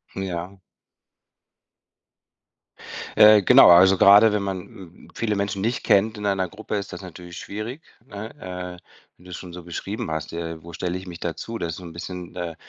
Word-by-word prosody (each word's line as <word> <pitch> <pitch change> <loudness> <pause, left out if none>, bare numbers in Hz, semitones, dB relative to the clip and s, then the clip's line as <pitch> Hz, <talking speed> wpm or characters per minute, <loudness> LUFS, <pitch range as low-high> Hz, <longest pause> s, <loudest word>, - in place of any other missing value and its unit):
Ja. 95 0 -5 2.6
Äh, 105 -1 +8
genau, - - +7
also, 95 +2 +7
grade 100 +4 +7
wenn 105 -1 -1
man, 95 -1 -3
hm, 90 -1 -15
viele 110 -3 -1
Menschen 100 0 -2
nicht 115 +3 -1
kennt 110 +2 +2
in 105 - -6
einer 95 -2 0
Gruppe, 110 +4 -6
ist 100 0 -6
das - - -8
natürlich 90 -1 -11
schwierig, 110 +9 -6 0.3
ne? 105 +2 -7 0.5
Äh, - - -33 0.4
wenn 90 - -21
du's 90 -1 -8
schon 90 -2 -10
so 90 -1 -9
beschrieben 90 +2 -5
hast: 80 -1 -4
„Ja, 85 0 -5
äh, 80 0 -13
wo 85 - -10
stelle 90 +1 -3
ich 95 0 -10
mich 85 -2 -9
dazu?“ 115 +7 -5
Das 85 -4 -4
ist - - -6
so 90 - -10
'n 85 - -9
bisschen 90 +1 -8
äh, 85 -2 -4
95 Hz, 190 wpm, -23 LUFS, 85-100 Hz, 2.6 s, Äh